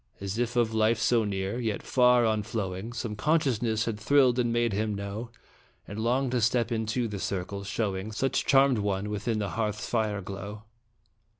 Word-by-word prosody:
As 100 +3 -4
if 120 0 -1
of 115 -2 +2
life 110 +1 +3
so 115 +1 +2
near, 100 +3 -2
yet 110 -4 -2
far 125 -1 +4
on 110 -1 +1
flowing, 100 -1 -4
Some 115 -3 -4
consciousness 120 -5 +1
had 110 -2 -3
thrilled 130 +1 +4
and 120 -1 +1
made 120 -2 +1
him 105 +1 -1
know 100 +4 -5 0.6
And 100 +2 -6
long 125 +3 +1
to 125 -1 +1
step 120 +1 +2
into 115 +1 -1
the 105 -2 -5
circle, 100 +1 -3
showing 100 0 -2
Such 130 +5 0
charmed 135 -3 +5
one 100 0 -1
within 105 +2 -1
the 105 -2 -2
hearth 105 +2 -2
fire's 105 -3 -1
glow. 100 +2 -7
110 Hz, 180 wpm, -28 LUFS, 100-120 Hz, 0.6 s, charmed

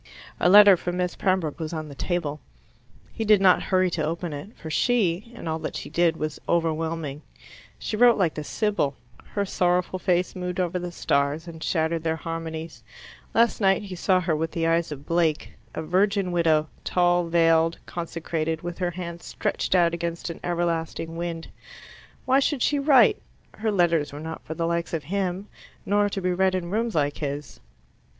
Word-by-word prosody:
A 175 - +4
letter 200 0 +9
from 175 +1 -4
Miss 180 -1 -1
Pembroke 185 -6 0
was 160 0 -4
on 155 -1 -4
the 145 - -9
table. 150 0 -2 0.7
He 225 - -3
did 210 -2 +5
not 185 -2 +5
hurry 185 -1 +1
to 160 - -1
open 165 +1 -3
it, 145 +10 -9
for 160 - -8
she, 210 0 +1
and 235 - -8
all 160 0 -1
that - - -5
she - - -6
did, 170 -1 +2
was 155 -1 -4
overwhelming. 160 -3 -1 0.6
She - - -4
wrote 240 +1 +6
like 180 -6 +1
the 150 - -5
Sibyl; 205 -6 -1 0.3
her 200 -1 -3
sorrowful 180 0 0
face 180 -1 0
moved 180 0 -4
over 180 0 0
the 175 0 -5
stars 145 0 0
and 160 -1 -8
shattered 160 -1 0
their 160 -1 0
harmonies; 160 -5 -6 0.5
last 230 0 +3
night 195 +1 +3
he 195 -2 -7
saw 185 +1 +2
her 170 -3 0
with 160 +1 -1
the 165 -1 -1
eyes 165 -1 +1
of 145 -1 -7
Blake, 165 -3 0 0.2
a 160 - -3
virgin 195 +2 +1
widow, 160 -3 +2 0.2
tall, 175 -1 +2
veiled, 165 0 +3
consecrated, 165 -1 -3
with 175 +1 -5
her 180 -1 0
hands 170 -1 -7
stretched - - -2
out 170 -2 +4
against 170 0 -3
an - - -9
everlasting 165 -1 -2
wind. 170 -1 -4 0.8
Why 260 +1 +4
should 275 -2 0
she 290 - +2
write? 275 -3 +5 0.3
Her 220 0 -2
letters 170 -6 +2
were 145 - -8
not 160 +1 -7
for 160 - -5
the 165 - -1
likes 170 0 -1
of 155 - -4
him, 190 +3 -2 0.4
nor 205 +1 +2
to 195 - -4
be 180 0 +1
read 190 +1 +2
in 175 -1 -3
rooms 225 0 -1
like 145 -1 +1
his. 145 -1 -5
170 Hz, 185 wpm, -25 LUFS, 160-185 Hz, 0.8 s, letter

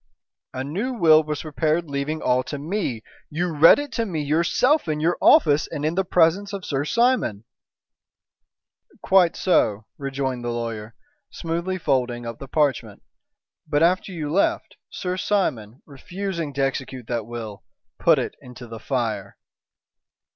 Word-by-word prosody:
"A 130 - -4
new 200 - -3
will 160 -8 +5
was 150 -1 -4
prepared 155 +2 -1
leaving 140 +2 -3
all 125 0 +2
to 145 - -5
me. 145 - -3 0.3
You 170 +1 -2
read 155 +3 +8
it 290 -1 -5
to 230 - -1
me 160 -5 -3
yourself 170 - +2
in 155 -1 -1
your 165 +3 +1
office 150 -1 +5
and 145 - -4
in 155 - 0
the 190 +2 +1
presence 180 +3 +2
of 195 -2 -5
Sir 140 0 -1
Simon." 235 - +1 1.6
"Quite 185 -3 +4
so," 110 - +1
rejoined 135 -3 -3
the 120 - -2
lawyer, 115 -2 -5 0.3
smoothly 170 +3 -3
folding 125 -7 -1
up 115 -1 -6
the 135 - -8
parchment; 135 -8 -1 0.6
"but 150 +1 +2
after 185 +3 +2
you 155 -5 -4
left, 195 - 0
Sir 180 0 -4
Simon, 135 - -1
refusing 170 +3 -5
to 135 0 0
execute 130 -2 -3
that 115 -2 -3
will, 115 -4 -7 0.4
put - - +4
it - - -2
into 125 0 -11
the 115 -1 -9
fire." 110 -6 -3
150 Hz, 150 wpm, -23 LUFS, 125-175 Hz, 1.6 s, read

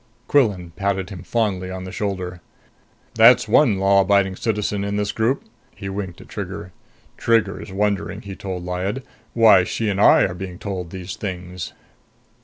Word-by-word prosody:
Quillan 100 -11 +2
patted 100 -1 -1
him 90 -4 -7
fondly 100 -5 -1
on 95 0 -6
the 95 - -7
shoulder. 95 -3 -4 0.7
"That's 115 +2 +6
one 120 -10 +4
law 100 +1 +4
abiding 95 -1 +2
citizen 105 -1 -1
in 100 0 -2
this 105 0 0
group!" 115 +5 0 0.3
He 95 -2 -6
winked 95 -3 -5
at - - -14
Trigger. 100 -1 -6 0.5
"Trigger's 110 -4 +1
wondering," 100 +1 -1
he 100 -2 -7
told 90 -2 -5
Lyad, 95 +8 -3 0.3
"why 110 -5 +7
she 110 +4 -2
and 100 0 0
I - - +7
are 90 - 0
being 90 0 -7
told 95 -3 -5
these 95 0 -6
things." 90 -3 -6
100 Hz, 160 wpm, -22 LUFS, 95-105 Hz, 0.7 s, why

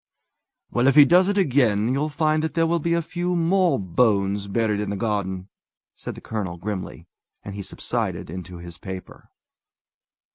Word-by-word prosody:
"Well, 120 +2 +2
if 135 - +4
he 145 -1 +9
does 180 +4 +5
it 205 0 0
again, 125 - +3
you'll 145 +3 0
find 155 0 +1
that 160 - -3
there 165 -1 +3
will 170 +1 +1
be 170 +2 +1
a 170 - 0
few 180 +2 -2
more 175 +1 +3
bones 100 0 +1
buried 105 0 0
in 105 -1 -2
the 100 - -2
garden!" 95 -3 -2 0.5
said - - -7
the - - -11
colonel 100 -6 -4
grimly; 95 +1 -5 0.4
and 100 - -6
he 100 - -5
subsided - - -3
into 90 +1 -8
his 85 0 -10
paper. 95 -3 -9
110 Hz, 175 wpm, -24 LUFS, 100-160 Hz, 0.5 s, he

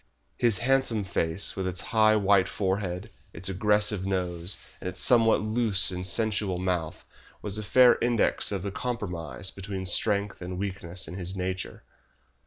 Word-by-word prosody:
His 115 -5 +2
handsome 125 -4 +1
face, 85 0 -1
with 95 -1 -2
its 90 -1 -2
high, 110 -1 +5
white 100 -2 +3
forehead, 95 +1 -2 0.2
its 95 +4 -5
aggressive 105 0 +2
nose, 90 -1 -2 0.2
and - - -6
its 90 - -8
somewhat 115 -4 +5
loose 110 -3 +2
and 90 0 -4
sensual 105 -1 0
mouth, 90 -4 -2 0.4
was 105 0 -1
a - - -4
fair 125 +4 +5
index 120 -3 +1
of 95 -3 -3
the 100 - -3
compromise 95 -6 -4
between 95 -1 -6
strength 100 +2 +1
and 90 0 -5
weakness 95 -2 -5
in 80 - -8
his 95 +1 -4
nature. 95 0 -4
95 Hz, 155 wpm, -27 LUFS, 90-110 Hz, 0.4 s, high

